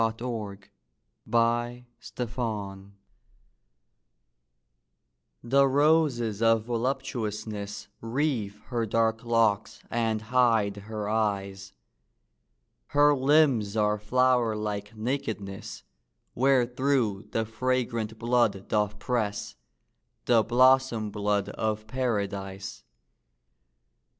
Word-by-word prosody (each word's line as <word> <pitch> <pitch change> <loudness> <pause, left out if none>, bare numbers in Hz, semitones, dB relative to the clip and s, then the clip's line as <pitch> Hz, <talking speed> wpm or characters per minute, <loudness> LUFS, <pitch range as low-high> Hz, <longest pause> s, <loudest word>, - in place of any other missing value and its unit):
THE 120 - -5
WORLD'S 115 - -4
DESIRE 110 -5 -3 2.6
The 135 +3 +4
roses 135 -6 +2
of 115 -1 +4
voluptuousness 110 -4 -3
Wreathe 115 -4 -1
her 120 -3 -1
dark 115 +1 +1
locks 115 -3 +1
and 110 -2 0
hide 115 -4 +2
her 105 0 -5
eyes; 100 -3 -2 1.1
Her 145 0 +4
limbs 130 -7 +3
are 105 0 +2
flower 125 0 +2
like 105 0 -4
nakedness, 110 -5 -4 0.5
Wherethrough 125 -4 +1
the 115 0 -1
fragrant 115 -1 -2
blood 115 -4 +1
doth 105 -1 0
press, 110 -5 -2 0.7
The 120 -2 +5
blossom 125 -2 +3
blood 105 -1 0
of 110 0 -2
Paradise. 100 -5 -3
115 Hz, 80 wpm, -27 LUFS, 105-125 Hz, 2.6 s, The